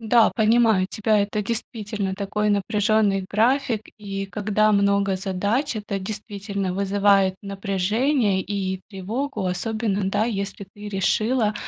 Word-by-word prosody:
Да, 225 0 +4
понимаю 220 -4 +3
тебя. 215 0 +1
Это 205 +1 -1
действительно 210 -3 -3
такой 210 +1 -1
напряженный 205 -1 +2
график. 235 +1 +2 0.2
И 195 -2 -5
когда 210 +2 +1
много 200 -1 +2
задач, 200 +9 -1
это 205 -2 -3
действительно 200 -1 -4
вызывает 195 0 +3
напряжение 200 +3 0
и 190 -2 -3
тревогу, 215 +5 -3
особенно, 205 +3 -1
да, 210 +2 +1
если 200 -3 -4
ты 205 0 -8
решила 215 +3 +1
205 Hz, 120 wpm, -23 LUFS, 195-220 Hz, 0.2 s, Да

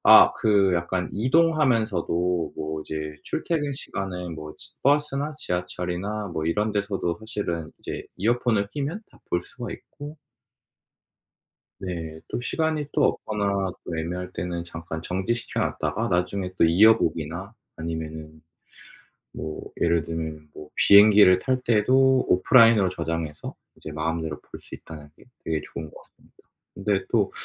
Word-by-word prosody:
아 - - +9
그 100 -3 +3
약간 90 +1 -1
이동하면서도 110 - +2
뭐 80 0 -4
이제 75 -1 -5
출퇴근 155 -3 -1
시간에 95 -9 -5
뭐 75 -1 -8
지 - - -11
버스나 145 +1 +1
지하철이나 90 +1 -3
뭐 80 -2 -3
이런 105 +5 0
데서도 100 -4 -1
사실은 85 -7 -4
이제 - - -6
이어폰을 110 -1 +1
끼면 150 +8 -3
다 - - -20
볼 85 - +2
수가 120 +4 -7
있고 145 +1 -10 1.6
네. 80 -4 -5
또 - - -3
시간이 155 +2 -1
또 - - +2
없거나 100 -3 0
또 85 - -4
애매할 90 +3 -4
때는 85 0 -3
잠깐 80 -1 -7
정지시켜 95 +8 -2
놨다가 - - -1
나중에 90 +1 -1
또 - - +4
이어보기나 90 -1 +3 0.2
아니면은 80 -1 -6 0.9
뭐 80 0 -6 0.2
예를 85 -1 +3
들면 80 -2 -5
뭐 75 - -10
비행기를 100 -2 +7
탈 130 +3 0
때도 130 +4 +4
오프라인으로 110 0 +6
저장해서 80 -3 -4 0.2
이제 80 - -8
마음대로 80 0 -3
볼 - - -11
수 - - -10
있다는 75 -2 -11
게 - - -18 0.2
되게 80 -2 -1
좋은 80 -2 -6
것 - - -19
같습니다. - - -27 0.4
근데 100 0 0
또 - - +2
90 Hz, 295 characters per minute, -25 LUFS, 80-110 Hz, 1.6 s, 아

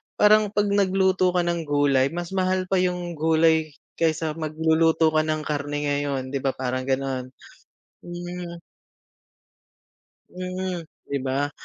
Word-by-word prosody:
parang 215 0 +5
'pag 205 -1 +2
nagluto 190 -2 +2
ka 175 - +3
ng 170 -2 -2
gulay, 140 -2 +3
mas 175 0 -4
mahal 185 -1 +1
pa 190 - +3
yung 180 -1 -1
gulay 160 -1 +3 0.2
kaysa 160 -1 +1
magluluto 160 +1 +2
ka 155 - +2
ng 155 0 -1
karne 145 -1 -3
ngayon 140 -2 -1
di 140 - -1
ba? 135 0 -1
Parang 130 0 -3
ganon, 130 -1 -1 0.7
hmm 175 0 -7 1.8
Mm, 185 -2 -4 0.2
di 140 - -3
ba? 135 +2 -1
160 Hz, 130 wpm, -24 LUFS, 145-180 Hz, 1.8 s, parang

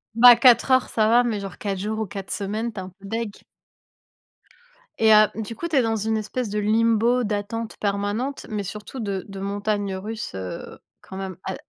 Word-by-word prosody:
Bah 245 +1 +9
4 245 +1 +5
heures 260 -1 +3
ça 215 -1 +2
va, 240 +2 +5
mais 230 -4 -1
genre 195 -2 -7
4 200 -2 -3
jours 215 +3 -3
ou 220 - -1
4 195 +1 -7
semaines, 215 +4 -2
tu 210 - -7
es - - -4
un 185 - -8
peu 195 - -11
dégoutée. 225 -1 -4 1.6
Et 220 -1 +5
heu, 215 0 +7
du 220 +1 -5
coup, 340 - -4
tu 325 - -2
es 265 - +5
dans 225 -1 0
une 220 +1 0
espèce 220 +2 -3
de 210 +1 -2
limbo 230 +3 +2
d'attente 215 +2 -3
permanente, 205 +7 -2
mais 210 -2 -3
surtout 210 +6 -7
de 200 -4 -3
de 195 -1 -8
montagnes 200 0 -2
russes, 210 - -6
heu, 95 -1 -7 0.2
quand 190 - -10
même 190 -1 -5
a 190 - -3
215 Hz, 205 wpm, -23 LUFS, 200-230 Hz, 1.6 s, Bah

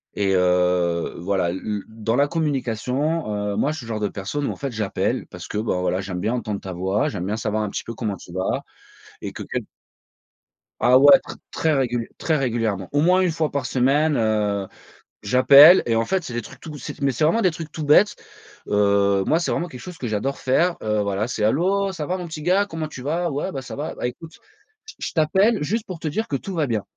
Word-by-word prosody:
Et 100 -1 +1
heu, 90 -1 +2
voilà 90 -1 0
l 95 - -4
l 105 -2 -3
dans 115 +2 -2
la 140 - +4
communication, 145 -1 -1 0.2
heu, - - -4
moi 145 - +1
je 155 - -5
suis 125 - -8
le - - -11
genre 110 -1 -2
de 105 - 0
personne 140 +9 -4
où - - -1
en - - -8
fait 140 -2 -4
j'appelle 105 -3 -2
parce - - -10
que, 105 - -4
ben, 105 -4 -1
voilà, 90 +1 0
j'aime 95 -2 -5
bien 105 +6 -1
entendre 110 -5 -3
ta 95 -1 -7
voix, 95 +4 0
j'aime 90 -4 -4
bien 105 +3 -2
savoir 110 0 -1
un 105 - -2
petit - - -5
peu 115 - -6
comment 105 -4 -3
tu 85 - -13
vas 95 +1 -1 0.6
et - - -5
que - - -7
quel - - -4 1.2
Ah 125 +1 +7
ouais 145 +6 +8
tr - - -10 0.2
très 160 -1 +1
réguliè 120 -4 0
très 160 -2 0
régulièrement, 115 -7 -1
au 145 +1 +2
moins 180 +3 +4
1 180 -3 +2
fois 160 -1 -1
par 140 - -2
semaine, 140 +4 +2
heu, 105 -3 0 0.6
j'appelle 140 - +8
et 115 - +2
en 115 - +1
fait 190 -1 0
c'est 120 - -7
des 120 - -2
trucs 130 +4 -13
tout, 155 -3 -8
c'est 140 - -8
mais 140 - +2
c'est 140 +5 0
vraiment 195 +9 +2
des 185 -5 +3
trucs 160 -1 -7
tout 155 +1 -6
bêtes, 150 +8 +5 0.5
heu. 100 -1 +3
Moi 160 - +3
c'est - - -1
vraiment 175 - -1
quelque 125 -7 -10
chose 180 -2 -9
que 125 - -4
j'adore 110 +6 -2
faire, 170 +7 +1
heu, 105 -1 0
voilà 100 +2 -1
c'est: 110 -3 -3
«Allô, 190 - +2
ça 160 -5 -5
va 180 +4 -1
mon 180 -2 -6
petit 155 -2 -7
gars, 190 +4 +3
comment 160 -4 -5
tu 130 -4 -9
vas? 165 +5 -1
Ouais, 145 +7 -3
bah, 135 - -5
ça 130 - -8
va, 150 +2 -4
bah, - - -3
écoute 160 +7 -10 0.5
j 445 - -12
je - - -4
t'appelle 190 +8 +2
juste 215 +9 -1
pour 180 -4 -7
te 160 - -4
dire 220 +10 -2
que 140 - 0
tout 195 - -7
va 160 -4 0
bien». 110 -5 -1
130 Hz, 245 wpm, -22 LUFS, 105-160 Hz, 1.2 s, ouais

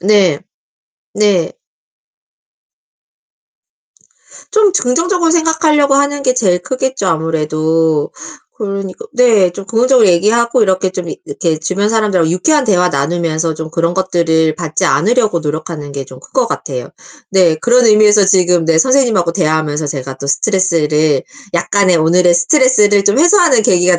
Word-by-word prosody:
네. 190 -6 +2 0.8
네. 205 -5 0 3.0
좀 435 -3 +2
저 - - 0
긍정적으로 330 +6 0
생각하려고 320 -4 +1
하는 285 0 0
게 255 -2 +1
제일 190 -8 +1
크겠죠 260 -1 -3
아무래도. 160 -1 -1 0.5
그러니까 200 - -6
네 230 -8 +3
좀 195 +3 -9
긍정적으로 235 +1 +2
얘기하고 230 +7 +1
이렇게 190 -1 0
좀 185 -2 -6
이 - - -7
이렇게 155 +2 -3
주변 185 +6 -2
사람들하고 205 -7 0
유쾌한 295 - +1
대화 180 -4 +2
나누면서 160 +2 -2
좀 160 0 -7
그런 170 +1 -1
것들을 165 -4 0
받지 165 -3 -3
않으려고 215 - +1
노력하는 155 -1 -6
게 140 -1 -6
좀 130 0 -14
큰 - - -18
것 255 -3 +1
같아요. 130 - -6 0.4
네 180 -5 +2
그런 240 +7 +2
의미에서 210 -1 +4
지금 180 -3 +2
네 165 0 +1
선생님하고 230 -7 +1
대화하면서 155 -3 -1
제가 135 -1 -6
또 140 - -6
스트레스를 155 -4 0 0.3
약간의 185 +1 +1
오늘의 175 +2 +3
스트레스를 205 - +2
좀 205 +6 +1
해소하는 340 - +3
계기가 180 -2 +2
185 Hz, 340 characters per minute, -13 LUFS, 160-235 Hz, 3.0 s, 의미에서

